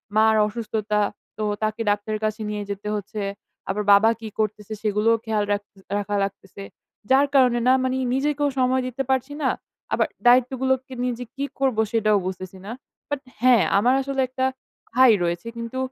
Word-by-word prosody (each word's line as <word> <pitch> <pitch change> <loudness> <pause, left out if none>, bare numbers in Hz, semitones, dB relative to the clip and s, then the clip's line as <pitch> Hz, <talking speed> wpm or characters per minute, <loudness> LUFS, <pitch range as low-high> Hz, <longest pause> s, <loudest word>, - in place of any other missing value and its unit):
মার 220 0 +5
অসুস্থতা। 215 -1 -2 0.4
তো 215 - -2 0.2
তাকে 215 +1 -1
ডাক্তারের 210 +1 -1
কাছে 215 +1 -2
নিয়ে 210 -1 -3
যেতে 200 +1 -6
হচ্ছে। 205 +1 -5 0.5
আবার 210 +2 -1
বাবা 215 +3 +6
কি 225 - -7
করতেছে 215 0 -2
সেগুলোও 215 +2 +2
খেয়াল 215 -2 0
রাখ 205 0 +1 0.4
রাখা 205 0 -2
লাগতেছে। 195 0 -7 0.5
যার 275 +2 +5
কারণে 250 -3 +5
না 260 - +6
মানে 260 0 0 0.2
নিজেকেও 290 +1 +1
সময় 255 0 +2
দিতে 260 +2 -3
পারছি 265 +2 0
না, - - +3 0.4
আবার - - +2 0.2
দায়িত্বগুলোকে 260 +1 +3
নিয়ে 250 -1 0
যে 245 - -5
কি 275 - -3 0.2
করব 265 -5 +1
সেটাও 215 -2 +3
বুঝতেছি 185 0 -6
না। 215 - -6 0.4
বাট 290 -1 -2 0.2
হ্যাঁ, 245 -4 +6
আমার 245 +5 +4
আসলে 270 0 -1
একটা 260 +1 -2 0.5
ভাই 255 -1 +7
রয়েছে। 170 +5 -2
কিন্তু 230 +2 -5
225 Hz, 165 wpm, -23 LUFS, 210-260 Hz, 0.5 s, ভাই